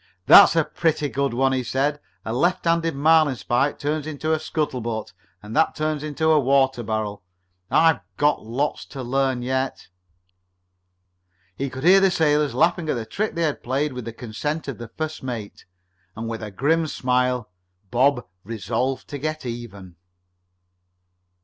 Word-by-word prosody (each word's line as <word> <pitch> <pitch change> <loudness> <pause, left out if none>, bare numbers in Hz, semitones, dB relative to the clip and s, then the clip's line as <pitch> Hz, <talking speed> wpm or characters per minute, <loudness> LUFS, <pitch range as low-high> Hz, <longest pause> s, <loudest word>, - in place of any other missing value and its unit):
"That's - - +8 0.2
pretty 160 -3 0
good," 140 0 -1 0.2
he 130 - 0
said. 135 +4 -1 0.3
"A 110 - -3
left 175 +9 +1
handed 165 -2 +1
marlinspike 145 -3 +2
turns 150 +1 -2
into 155 +1 -2
a 160 - +1
scuttle 155 -5 -2
butt, 110 -1 -4 0.3
and 105 +2 -8
that - - +2
turns 155 -1 -1
into 155 +1 0
a 155 - +5
water 135 -2 +2
barrel. 105 -2 -3 0.5
I've 160 -1 +4 0.2
got 145 0 +2
lots 130 +7 -2
to 135 -3 -7
learn 130 0 0
yet." 130 +1 -2 1.7
He 135 +4 -3
could 130 +1 -8
hear 185 +3 +7
the 195 0 +4
sailors 150 -6 +1
laughing 170 +3 +2
at - - +1
the 115 -2 -4
trick 205 - -3
they 170 - 0
had 150 -3 -1
played, 135 +3 -1
with 125 -2 -6
the 115 - -5
consent 140 +8 -4
of 135 - -5
the 120 - -7
first 155 +6 -5
mate, 120 -6 -6 0.5
and 115 +1 -5
with 115 -1 -5
a 110 - -5
grim 155 - +1
smile 125 -5 0 0.4
Bob 125 +1 +2 0.2
resolved 115 +5 -3
to 145 - -5
get 155 0 -4
even. 100 -7 -8
135 Hz, 155 wpm, -23 LUFS, 120-155 Hz, 1.7 s, That's